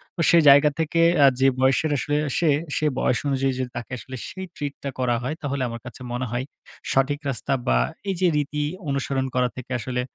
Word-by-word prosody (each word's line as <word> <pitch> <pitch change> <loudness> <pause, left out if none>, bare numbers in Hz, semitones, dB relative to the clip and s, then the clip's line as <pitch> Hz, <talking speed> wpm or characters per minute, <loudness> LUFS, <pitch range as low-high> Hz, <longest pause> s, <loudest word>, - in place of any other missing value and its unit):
তো, 170 - -2
সে 170 - +6
জায়গা 145 +2 +7
থেকে 165 +1 +1 0.2
আ - - +8
যে 135 - +5
বয়সের 135 +4 +2
আসলে 145 +3 -1 0.2
সে, 170 - +2 0.3
সে 155 - 0
বয়স 120 - +1
অনুযায়ী 135 -1 +1
যদি 130 -1 -2
তাকে 120 - -7
আসলে 130 +2 -9
সেই 190 0 -7
ট্রিটটা 140 -1 -5
করা 125 -2 +1
হয়, 150 +5 -2
তাহলে 140 -2 -2
আমার 115 0 -7
কাছে 120 +1 -10
মনে 125 +1 -2
হয় 125 +2 -2 0.5
সঠিক 135 +2 +2
রাস্তা 135 +1 -2
বা, - - +4 0.3
এইযে 185 -1 +1
রীতি 150 0 -1 0.3
অনুসরণ 135 -1 -1
করা 125 -1 +2
থেকে 130 0 -9
আসলে 125 +2 -2
135 Hz, 195 wpm, -24 LUFS, 125-145 Hz, 0.5 s, আ